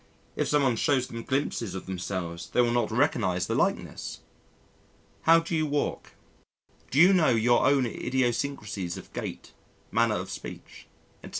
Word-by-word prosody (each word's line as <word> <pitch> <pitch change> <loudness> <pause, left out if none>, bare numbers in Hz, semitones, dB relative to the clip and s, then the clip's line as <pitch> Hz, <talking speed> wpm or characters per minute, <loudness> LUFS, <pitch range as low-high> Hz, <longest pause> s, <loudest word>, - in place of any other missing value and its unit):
If - - 0
someone 135 -5 +2
shows 130 +1 +2
them 115 -2 -7
glimpses 115 -7 -2
of 95 - -6
themselves 90 -2 -5
they 125 - +3
will 120 -1 +2
not 120 -2 +1
recognise 110 - +1
the - - -2
likeness. - - -2 1.1
How 165 0 +8
do 165 0 -3
you 155 -1 +1
walk? 145 0 -2 0.8
Do 135 - +1
you 180 +4 +8
know 175 -4 +4
your 120 +1 +3
own 140 -2 +3
idiosyncrasies 120 -6 -2
of - - -12
gait, - - -6 0.4
manner 115 -1 +2
of 95 +1 -4
speech, - - -9 0.4
etc.? - - -9
120 Hz, 155 wpm, -27 LUFS, 100-140 Hz, 1.1 s, How